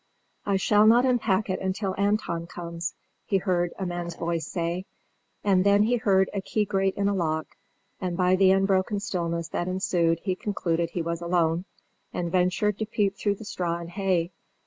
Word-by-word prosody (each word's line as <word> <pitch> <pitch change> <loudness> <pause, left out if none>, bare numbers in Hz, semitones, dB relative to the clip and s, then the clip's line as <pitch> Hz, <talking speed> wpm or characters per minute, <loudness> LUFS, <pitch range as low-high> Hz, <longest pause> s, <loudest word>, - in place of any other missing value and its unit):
"I 200 - +2
shall 210 +2 +4
not 240 +3 +6
unpack 220 -5 +2
it 190 -1 -2 0.2
till 195 -3 -2
Anton 200 -4 0
comes," 170 -1 -5 0.3
he 195 - +1
heard 175 -2 0
a 190 - -3
man's 175 -1 -4
voice 170 -1 -2
say; 175 +1 -3 0.6
and 190 -2 +3
then 200 +1 +5
he 240 +3 +2
heard 190 -4 +3
a 200 - -2
key 210 +2 0
grate 195 -1 0
in 200 0 0
a 200 - +2
lock, 160 -4 -2 0.4
and 180 -2 -3
by 180 0 +4
the 190 0 +5
unbroken 195 +1 +2
stillness 170 -5 -2
that 175 - -2
ensued 175 -3 +1
he 190 - 0
concluded 170 -4 -1
he 170 0 -3
was 170 0 -3
alone, 170 0 +1 0.5
and 170 -1 -3
ventured 185 +3 +1
to 220 - -2
peep 200 -2 0
through 205 0 0
the 215 - -11
straw 175 -4 -2
and 170 0 -8
hay. 185 -3 0
185 Hz, 185 wpm, -26 LUFS, 170-200 Hz, 0.6 s, not